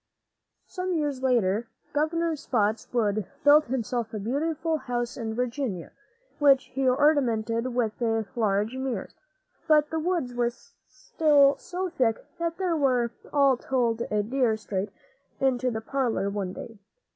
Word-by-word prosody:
Some 365 0 -3
years 290 -4 -1
later, 235 -4 +1 0.3
Governor 330 +3 +1
Spots´wood 215 - 0 0.2
built 295 +1 +7
himself 240 -2 -3
a - - -3
beautiful 310 +8 -1
house 240 -3 -3
in 220 -3 -4
Virginia, 245 - -3 0.5
which 275 -2 +4
he 265 0 +2
ornamented 245 -4 +1
with 225 -2 -1 0.3
large 215 +1 0
mirrors. 260 -6 -4 0.5
But 300 -1 +4
the 320 - -1
woods 325 -7 -1
were 240 -1 +1 0.4
still 285 -3 +3
so 370 +1 -4
thick 245 -9 +2 0.2
there 335 0 +1
that 340 0 -1
we 245 -4 0
are 275 -3 +4
told 235 -3 0
a 210 -1 +1
deer 240 -1 +1
strayed 205 -2 -3 0.5
into 255 -1 +1
the 220 -2 -3
parlor 225 -6 -1
one 195 -3 -3
day. 225 +1 -9
250 Hz, 135 wpm, -26 LUFS, 225-290 Hz, 0.5 s, built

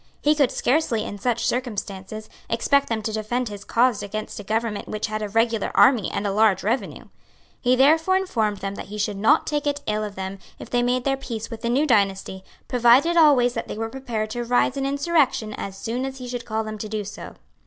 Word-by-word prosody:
He 295 - +3
could 285 -4 +3
scarcely, 250 -5 +1
in 205 - -7
such 235 +2 0
circumstances, 215 -4 -4 0.2
expect 280 +5 +2
them 220 -2 -2
to 220 - -3
defend 220 +3 -2
his 205 -1 -8
cause 240 -2 +2
against 215 +1 -5
a - - -7
government 220 0 -2
which 215 - -3
had 215 0 -3
a 210 - -3
regular 225 0 +1
army 245 -7 +5
and 200 - -3
a 200 - 0
large 210 -2 +3
revenue. 235 +6 -2 0.6
He 250 0 +3
therefore 320 +8 +4
informed 220 - -1
them 195 0 -3
that - - -8
he 210 +2 -7
should 210 0 -1
not 210 +3 +4
take 295 -1 -1
it 285 0 -1
ill 215 0 -1
of 205 -1 -6
them 190 +1 -5 0.2
if - - -11
they 245 - +2
made 245 +1 +1
their 270 0 0
peace 230 -4 -6
with 225 -1 -7
the 235 - -1
new 270 +5 +2
dynasty, 195 -6 +1 0.2
provided 250 +7 +4
always 280 -7 +5
that - - -4
they - - -6
were 225 0 -3
prepared 225 -4 -4
to 240 +1 -3
rise 245 +2 +2
in 275 0 -1
insurrection 280 -6 +1
as 195 -1 -6
soon 235 +5 -3
as 270 0 -5
he 250 -1 -7
should 245 -1 -5
call 220 -1 -2
on - - -6
them 215 0 -5
to 215 - -5
do 215 -1 -3
so. 205 - -9
230 Hz, 230 wpm, -23 LUFS, 210-260 Hz, 0.6 s, army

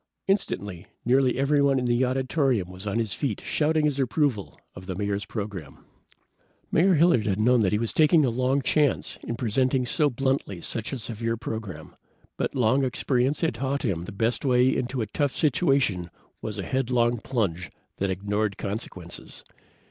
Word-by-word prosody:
Instantly, 100 - -1 0.2
nearly 130 0 +3
everyone 140 0 +3
in 125 - 0
the 120 +1 +2
auditorium 130 - 0
was 95 +3 -9
on 100 - -1
his 115 -3 -1
feet 130 -9 -2
shouting 155 0 +1
his 145 -2 0
approval 130 -4 0
of 95 0 -11
the 95 - -3
Mayor's 100 +1 -2
program. 100 -6 -6 0.9
Mayor 180 +3 +4
Hilliard 155 -9 +4
had 100 0 0
known 120 +1 +4
he 105 +2 +2
was 115 +1 -1
taking 155 -1 +5
a 125 - +1
long 130 +3 +1
chance 150 0 +1
in 115 - -4
presenting 130 +2 +1
so 145 +4 +2
bluntly 130 -7 -1
such 110 +5 -4
a 135 - -3
severe 115 0 -3
program, 110 -9 -6 0.4
but - - -2
long 130 +2 +3
experience 130 +1 0
had 165 -5 +1
taught 135 +4 -2
him 90 -6 -1
the - - -7
best 110 +5 -1
way 125 -1 +3
into 125 0 -2
a - - -2
tough 140 +6 -1
situation 135 - +1 0.3
was - - -5
a - - -3
headlong 120 -2 +1
plunge 95 -9 -2 0.3
that 100 - -1
ignored 100 +2 -1
consequences. 100 -4 -6
120 Hz, 165 wpm, -26 LUFS, 105-135 Hz, 0.9 s, taking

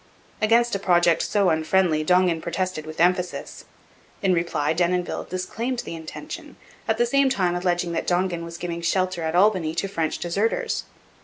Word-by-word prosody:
Against 235 +2 +3
a 200 - 0
project 175 -3 +3
so 200 -3 +2
unfriendly 160 0 +2
Dongan 180 -1 +3
protested 175 -2 -3
with 155 0 -8
emphasis. 180 +1 0 0.6
In 190 -2 +3
reply 170 -3 0
Denonville 175 +1 0
disclaimed 230 +7 -3
the - - -6
intention, 160 -1 -8 0.3
at 220 - +1
the 240 - +3
same 275 +3 +3
time 185 -8 +1
alleging 175 -1 0
that 165 - -2
Dongan 175 -1 0
was 170 0 -7
giving 170 -1 -4
shelter 185 +1 0
at 160 +1 -2
Albany 180 -5 +3
to 195 - -1
French 165 -5 -2
deserters. 225 - -1
180 Hz, 160 wpm, -24 LUFS, 170-195 Hz, 0.6 s, Against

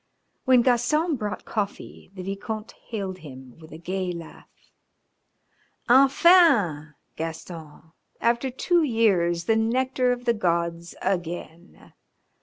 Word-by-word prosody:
When 255 -2 +5
Gaston 285 +7 +2
brought 210 -4 -5
coffee 205 -2 -5
the 185 - -7
Vicomte 210 +3 -5 0.2
hailed 195 -5 -5
him 130 -4 -12
with 160 -1 -15
a 155 - -9
gay 185 +2 -3
laugh. 170 -2 -10 1.4
"Enfin, 260 - +4 0.2
Gaston, 160 -1 -8 0.3
after 235 +3 +1
two 345 +7 +1
years 195 - +1
the 220 +5 +2
nectar 250 +3 +1
of 245 0 -4
the 235 - +3
gods 170 -4 -2
again! 175 -1 -5
200 Hz, 110 wpm, -25 LUFS, 170-245 Hz, 1.4 s, When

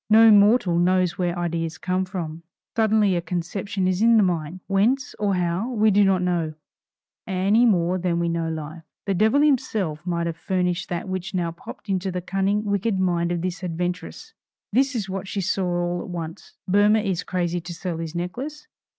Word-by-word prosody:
No 225 +1 +8
mortal 205 -3 +5
knows 180 0 +2
where 175 -1 0
ideas 165 -2 -2
come 185 0 -1
from. 170 -4 -5 0.3
Suddenly 215 -3 +3
a 175 - 0
conception 185 +3 -3
is 185 +1 0
in 230 0 +6
the 215 - +5
mind, 175 -1 -2
whence, 230 +7 +1
or 205 -2 +1
how, 180 +5 -1
we 220 -3 +3
do 205 +1 +5
not 190 -2 +2
know, 170 -3 -1 0.7
any 200 +5 +3
more 180 -3 +2
than 175 -1 0
we 170 0 0
know 165 -1 -1
Life. 155 +1 -6 0.2
The 200 - 0
devil 220 +9 +3
himself 215 - +1
might 170 -1 -1
have 165 -1 -3
furnished 180 -1 -1
that 175 +2 -3
which 185 +1 -4
now 170 -2 0
popped 170 - -11
into 190 -1 -1
the 180 - -2
cunning, 195 +3 0
wicked 200 0 0
mind 175 -2 +1
of 175 -1 -2
this 185 +1 -4
adventuress. 180 - -4 0.4
This 265 +3 +2
is 210 -4 -2
what 190 0 -5
she 200 - -3
saw 190 0 0
all 175 0 -1
at - - -8
once: 165 -2 -7
Boehmer 205 +3 +4
is 190 -4 -1
crazy 175 -1 -2
to 175 - -8
sell 170 -1 -4
his 165 0 -5
necklace. 265 - -5
185 Hz, 190 wpm, -23 LUFS, 175-205 Hz, 0.7 s, No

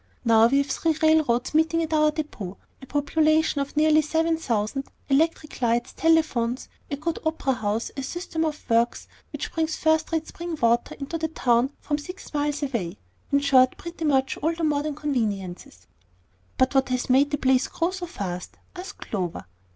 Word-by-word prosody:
Now 225 -1 +6
we 275 +4 +2
have 280 - +3
three 325 -1 +1
railroads 310 -7 +3
meeting 320 +1 +2
at 320 0 -3
our 305 0 +4
depot, 260 - -5 0.2
a 265 - -11
population 310 +1 +2
of 280 +2 -5
nearly 310 0 +5
seven 325 +2 +1
thousand, 255 -2 -2 0.2
electric 305 0 +1
lights, 240 +1 +1
telephones, 290 -7 +1 0.2
a 280 - -1
good 320 +3 -3
opera 315 -4 0
house, 220 -1 -2
a 275 - -3
system 325 +3 -3
of 305 -1 -3
works 230 +1 +1 0.2
which - - -5
brings 320 -1 0
first 315 +1 +1
rate 320 -1 -1
spring 340 -1 -6
water 235 0 +2
into 290 +4 -5
the 320 - 0
town 250 -5 +2
from 295 0 -2
six 360 +4 -10
miles 295 0 -1
away, 235 -11 -3 0.3
in 280 - +3
short, 260 -2 +4
pretty 340 -1 -7
much 270 -2 +2
all 325 +2 0
the 335 - -4
modern 300 -1 0
conveniences." 200 - -3 0.7
"But 260 +1 +2
what 265 -1 +2
has 255 -1 -1
made 270 +3 +4
the 290 - -1
place 260 -1 +2
grow 335 +2 -1
so 370 -2 -5
fast?" 180 - -6 0.2
asked 365 +1 -8
Clover. 180 -5 -4
290 Hz, 175 wpm, -25 LUFS, 245-320 Hz, 0.7 s, Now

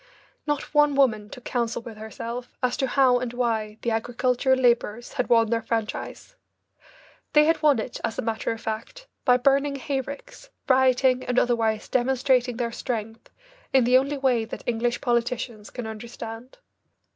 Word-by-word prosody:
Not 295 0 -2
one 295 -1 +4
woman 220 -7 +2
took 250 0 -11
counsel 235 -2 -2
with 225 -2 -9
herself 230 +3 -7
as 250 -1 +1
to 265 - 0
how 255 -1 +4
and 245 -1 -4
why 220 -3 -1
the 235 - 0
agricultural 250 +3 +1
labourers 240 -2 +1
had 250 - -2
won 230 -1 +4
their 230 -1 +1
franchise. 225 - -4 1.0
They 300 0 +6
had 320 0 +2
won 295 -4 +5
it, 230 +2 -5
as 225 - -2
a - - -2
matter 220 -1 -2
of 225 - -5
fact, 225 - -6 0.2
by 250 -2 +5
burning 275 +2 +2
hay 275 0 -2
ricks, 280 - -10 0.2
rioting, 260 -1 +3
and 250 0 -2
otherwise 225 -3 +1
demonstrating 255 -1 +1
their 235 -2 -2
strength 225 -2 -5 0.4
in 265 -2 +5
the 250 +2 +5
only 280 +2 -2
way 255 -4 +2
that 225 - -8
English 240 +1 -1
politicians 235 -2 -1
can 245 - -6
understand. 225 - -8
245 Hz, 165 wpm, -25 LUFS, 225-260 Hz, 1.0 s, They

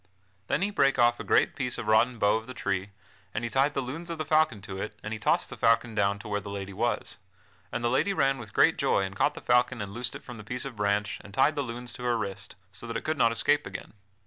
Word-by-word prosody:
Then 165 - +1
he 205 - 0
brake 140 -8 +3
off 120 0 +4
a - - -4
great - - +3
piece 125 -2 -2
of - - -4
rotten 110 +3 +3
bough 105 0 +3
of 110 +1 -8
the 130 - -8
tree 100 0 -2 0.5
and 110 - -1
he 120 - -2
tied 140 +2 +2
the 135 - 0
lunes 160 +7 -6
of 165 - -4
the 155 - -3
falcon 155 -7 +3
to 95 -2 -6
it 105 - -5
and 110 - -4
he 110 - -5
tossed 105 - +1
the - - -5
falcon 115 0 +3
down 100 -1 +1
to 105 - -10
where 105 -1 -1
the 100 - -8
lady 100 -1 -5
was; - - -2 0.5
and 120 - -3
the - - +3
lady 165 +10 +2
ran 135 -7 +2
with 110 -4 -9
great - - +4
joy - - +2
and 95 0 -5
caught 145 +9 +2
the - - -8
falcon 125 0 +2
and 100 -2 -5
loosed 120 +2 -2
it - - -9
from 125 - -9
the - - -8
piece 125 +5 -3
of 135 -3 -6
branch 105 0 0
and 100 0 -12
tied 135 +4 +4
the 145 - -1
lunes 120 -1 -5
to 125 - -8
her 120 -1 +1
wrist, 100 -2 -5 0.2
so 95 +4 -8
that 115 0 -2
it - - -6
could 155 - 0
not 115 -2 +5
escape 115 - +2
again. - - -8
115 Hz, 280 wpm, -28 LUFS, 105-130 Hz, 0.5 s, not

